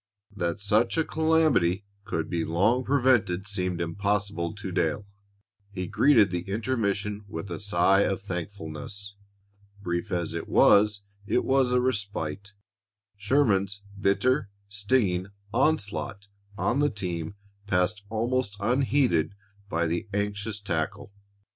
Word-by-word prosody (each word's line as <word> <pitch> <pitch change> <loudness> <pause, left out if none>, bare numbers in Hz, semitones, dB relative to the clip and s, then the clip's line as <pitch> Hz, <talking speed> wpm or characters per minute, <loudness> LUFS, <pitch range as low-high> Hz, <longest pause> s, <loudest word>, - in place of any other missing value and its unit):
That 85 -2 -2
such 105 +7 +2
a 160 - +2
calamity 155 - +2 0.2
could 80 -4 -2
be 85 -2 -1
long 100 +11 +2
prevented 120 -9 +2
seemed 90 -3 -1
impossible 100 +1 -1
to 100 -2 -6
Dale. 85 +3 0 0.6
He 95 -2 -4
greeted 110 -1 +4
the 90 -1 -1
intermission 105 -2 -1
with 90 0 -6
a 85 - -4
sigh 95 -1 +3
of 95 - +1
thankfulness. 95 +1 -5 0.6
Brief 85 -3 -3
as 85 -2 -1
it 85 - -5
was, 105 0 +5 0.2
it 125 - +1
was 130 -2 +3
a 125 - +4
respite. 100 -6 -2 0.6
Sherman's 100 -3 +1 0.2
bitter, 100 +5 +2 0.2
stinging 100 -3 +1 0.3
onslaught 115 -7 0 0.3
on 120 +4 +1
the 145 0 +3
team 90 - -4 0.3
passed 95 +2 +1
almost 115 -1 -1
unheeded 120 - +2 0.3
by 85 -1 0
the 85 +6 -2
anxious 105 +1 -2
tackle. 85 0 -3
100 Hz, 120 wpm, -27 LUFS, 90-110 Hz, 0.6 s, was